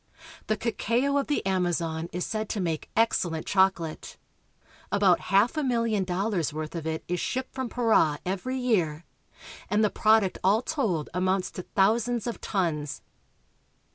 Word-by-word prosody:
The 215 - +1
cacao 235 +5 0
of 280 - 0
the 290 - -1
Amazon 170 -3 -1
is 180 +1 -3
said 215 -1 -3
to 215 - -2
make 165 -4 -2
excellent 175 -8 +1
chocolate. 190 -5 0 0.7
About 195 -3 +4
half 200 - +4
a - - +2
milHon 230 -7 0
dollars' 185 -2 -1
worth 155 0 -5
of 165 -2 -4
it 160 0 -3
is 180 0 -1
shipped 260 +1 -3
from 260 -2 -3
Para 220 -11 +3
every 200 +8 -2
year, 175 -11 0 0.6
and 210 +1 +2
the 210 - +2
prod 220 0 +4
uct 190 - -3
all 205 +6 +3
told 215 - -1
amounts 185 +1 0
to - - -6
thousands 225 +5 +1
of 235 - -4
tons. 160 -7 -2
195 Hz, 155 wpm, -27 LUFS, 175-230 Hz, 0.7 s, About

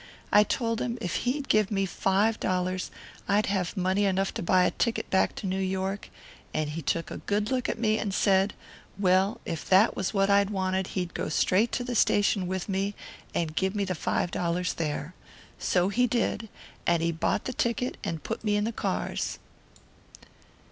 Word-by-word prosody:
I 210 - +7
told 230 +1 -1
him 240 0 -2
if 180 -6 -3 0.2
he'd 280 +2 -2
give 215 -2 +3
me 195 -2 +1
five 195 +4 +1
dollars 185 0 -1 0.4
I'd 205 +2 +3
have 190 0 -1
money 190 +2 +2
enough 195 0 +1
to - - -4
buy 185 +1 +4
a - - +3
ticket 235 -2 -1
back 190 - +2
to - - -6
New 190 0 -1
York, 190 +1 -2 0.5
and 155 -1 0
he 165 +2 -4
took 165 +3 -1
a - - -4
good 210 +2 -1
look 255 -2 0
at - - -2
me 220 -1 +1
and 205 - -2
said, 195 +1 +2 0.4
well, 190 +1 +3
if 165 - -5
that 195 +4 +5
was 190 - -1
what 195 -2 +2
I 200 0 +5
wanted 190 -2 -1
he'd 180 -2 -2
go - - -3
straight 195 +8 +2
to 245 - 0
the 245 0 -3
station 205 -4 +3
with 185 0 -3
me 200 +1 -1 0.4
and 160 -2 -1
give 190 +3 0
me 200 -1 0
the 185 - -1
five 175 +1 -1
dollars 175 +1 -1
there. 155 +1 -3 0.5
So 180 +1 +2
he 245 +5 +2
did 230 -2 -1 0.4
and 170 -1 +3
he 170 - +2
bought 165 - -1
the 255 - -3
ticket, 240 +1 -1
and 165 -2 -3
put - - -4
me 210 -1 +1
in 205 - +1
the 225 - -1
cars." - - -2
195 Hz, 195 wpm, -28 LUFS, 185-210 Hz, 0.5 s, I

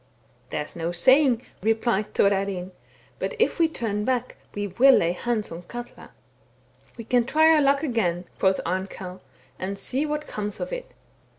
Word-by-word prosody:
' - - -35
There 150 - -2
is - - -13
no 170 0 -2
saying,' 255 - +4 0.2
replied 220 0 0
Thorarinn; 195 -2 +1 0.2
* - - -31
but - - -3
if 455 -4 +1
we 330 - +5
turn 220 -9 -3
back 250 0 -1 0.2
we 205 0 -2
will 250 +8 +5
lay 170 - +2
hands 215 +4 -2
on 165 +1 -6
Katla.' 240 +6 -9 0.5
* - - -33
We 230 - -6
can 245 +2 +2
try 315 +6 +5
our 305 - +4
luck 280 +1 +3
again,' 185 - 0
quoth 190 0 +3
Arnkell; 185 0 -4 0.2
* 130 - -32
and 195 +2 -3
see 270 +8 -2
what 300 0 -2
comes 210 -1 -5
of - - -4
it.' - - -6
220 Hz, 185 wpm, -25 LUFS, 190-270 Hz, 0.5 s, we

